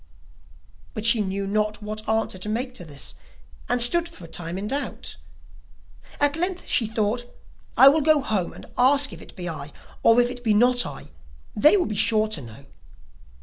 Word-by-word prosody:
But 215 - -3
she 230 -1 +5
knew 195 0 -3
not 210 +1 -1
what 215 +1 -6
answer 220 -4 -1
to 210 - -5
make 250 +4 -3
to 185 - -8
this, 145 -3 -6 0.6
and 245 - +1
stood 335 +8 +4
for 195 - -11
a - - -11
time 170 +2 -5
in 200 +2 -4
doubt; 280 +6 -3 1.0
at 290 0 +2
length 360 +2 -2
she 225 - +1
thought: 225 +2 -1 0.5
'I 270 - +9
will 310 +3 +2
go 310 0 +4
home 205 -9 -1
and - - -12
ask 280 +3 +4
if - - -11
it - - -14
be 180 -1 -6
I, 150 -3 -7 0.3
or 230 +1 +5
if 245 0 +2
it 245 -1 -10
be 220 -3 +2
not 245 +2 +3
I, - - -10 0.5
they 300 - +5
will 360 - +1
be 215 - -4
sure 215 +1 +3
to 180 -9 -1
know. 115 +3 -12
220 Hz, 190 wpm, -24 LUFS, 200-255 Hz, 1.0 s, I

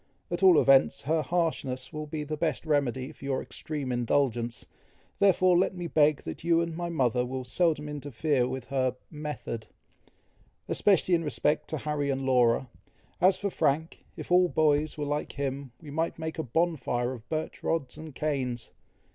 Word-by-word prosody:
At 175 - -2
all 185 -4 +7
events, 135 -1 +4
her 160 +3 +1
harshness 155 -6 -2
will 155 0 -5
be 150 0 -4
the 155 +1 -3
best 155 -1 -1
remedy 140 -3 0
for - - -16
your 135 -1 -1
extreme 145 -4 -5
indulgence; 120 -1 0 0.5
therefore 185 -2 +5
let 185 +1 +2
me 175 -1 -5
beg 155 -3 +3
that 80 - -7
you 170 0 +3
and 170 -1 -2
my 175 0 -3
mother 125 -6 +1
will 130 +1 -4
seldom 150 +2 +1
interfere 145 -2 -1
with 130 -1 -5
her 130 -2 0 0.2
'method,' 150 -7 -5 1.0
especially 190 -2 +3
in 165 -1 +3
respect 150 0 0
to 155 - -2
Harry 145 -1 -2
and 135 0 -1
Laura. 125 -1 +3 0.5
As 185 +1 +5
for 200 -1 -2
Frank, 160 +1 0
if - - -8
all 180 0 +6
boys 155 -1 +2
were 150 - -2
like 145 +1 -2
him, 140 -1 -4
we 150 -3 -10
might 160 +3 -1
make 160 0 -5
a - - 0
bonfire 130 -4 0
of 120 -2 -11
birch 155 0 -3
rods 145 -6 -1
and 155 -3 -10
canes. 130 -6 -2
150 Hz, 170 wpm, -28 LUFS, 130-160 Hz, 1.0 s, all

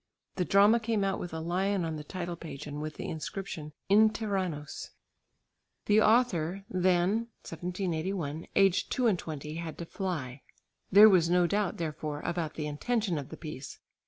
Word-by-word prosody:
The 180 - +1
drama 205 +5 +5
came 225 -3 0
out 195 -1 0
with 175 - -5
a 160 - -4
lion 185 +3 0
on 160 -1 -3
the 150 - -6
title 175 +2 -5
page 155 -4 -8
and 150 0 -5
with 155 0 -5
the - - -5
inscription 160 -2 -5 0.2
"In 215 +2 +6
Tyrannos." 185 -9 -3 1.0
The 210 +1 +5
author 200 -6 +2
then 185 +5 +2 0.2
(1781) 170 -2 -3
aged 195 -2 +3
two 255 - +1
and 205 -7 +3
twenty 155 0 -6
had 165 -2 -5
to 170 - -5
fly. 155 - -4 0.5
There 205 +3 +10
was 180 -5 +4
no 180 0 +4
doubt 200 +1 0
therefore 155 -2 -4
about 170 -3 -3
the 155 - -3
intention 180 +4 -1
of 140 - -8
the 160 - -8
piece. 145 -4 -8
175 Hz, 165 wpm, -30 LUFS, 155-200 Hz, 1.0 s, There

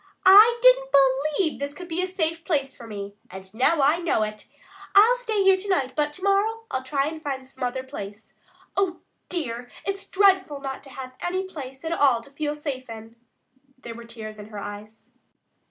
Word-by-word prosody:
I 425 +5 +9
didn't - - +6
believe 285 +5 +2
this 285 +1 -4
could 360 - -9
be 340 +1 -1
a 370 - -1
safe 330 -3 -2
place 280 -5 -1
for 235 - -11
me, 200 -2 -7 0.2
and 190 +1 -11
now 275 +6 +2
I 300 +5 +4
know 330 -10 +1
it. 215 0 -6 0.5
I'll 435 +5 +7
stay 445 -5 0
here 385 0 +6
to 395 +2 -6
night, 270 -9 +1
but 295 -1 0
to 370 - -7
morrow 415 +3 +1
I'll 260 - -1
try 275 +1 -1
to 320 - -8
find 270 -4 -5
some 260 0 -9
other 250 +1 -2
place. 210 -5 -9 0.4
Oh, 380 -3 0 0.3
dear, 245 -8 -3 0.2
it's 395 0 -4
dreadful 380 -7 +3
not 270 -1 -5
to - - -12
have 260 -1 -8
any 370 +2 -1
place 280 -6 -9
at 325 - -2
all 275 -8 +3
to 275 - -15
feel 295 +1 -3
safe 275 -4 -5
in." 225 0 -10 0.6
There 235 -3 -8
were 235 0 -10
tears 215 -2 -8
in 210 - -9
her 215 -1 -10
eyes. 205 +2 -9
285 Hz, 200 wpm, -25 LUFS, 245-370 Hz, 0.6 s, I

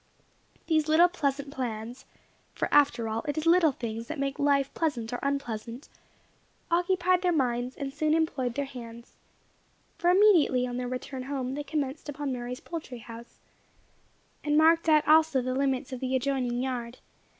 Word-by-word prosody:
These 315 -2 +1
little 320 +3 +6
pleasant 280 -4 -2
plans 240 -2 -5 0.5
(for - - -1
after 265 -6 +3
all 220 +1 -2
it 290 - -2
is 310 - -2
little 335 -2 +5
things 230 -2 -6
that 315 - -5
make 275 0 -3
life 280 -1 +2
pleasant 250 -8 -2
or 245 - -2
unpleasant), 245 -3 -4 0.8
occupied 360 +1 +2
their 360 -1 +2
minds, 250 -4 0
and 275 -1 -5
soon 305 +2 +1
employed 265 -7 -1
their 285 - -1
hands; 235 -3 -11 0.8
for 350 - +2
immediately 355 -10 +5
on 245 -1 -4
their 250 0 -3
return 255 +1 -5
home 265 -2 -3
they 295 +2 -4
commenced 295 -1 -4
upon 290 -1 -3
Mary's 245 0 -5
poultry 315 -7 -7
house, 230 +1 -12 1.1
and 295 0 +1
marked 325 +1 +4
out 305 -1 +4
also 315 -2 +5
the 255 0 -2
limits 270 0 -1
of 255 - -5
the 260 0 -1
adjoining 255 -2 -1
yard. 245 -2 -4
275 Hz, 160 wpm, -28 LUFS, 245-310 Hz, 1.1 s, little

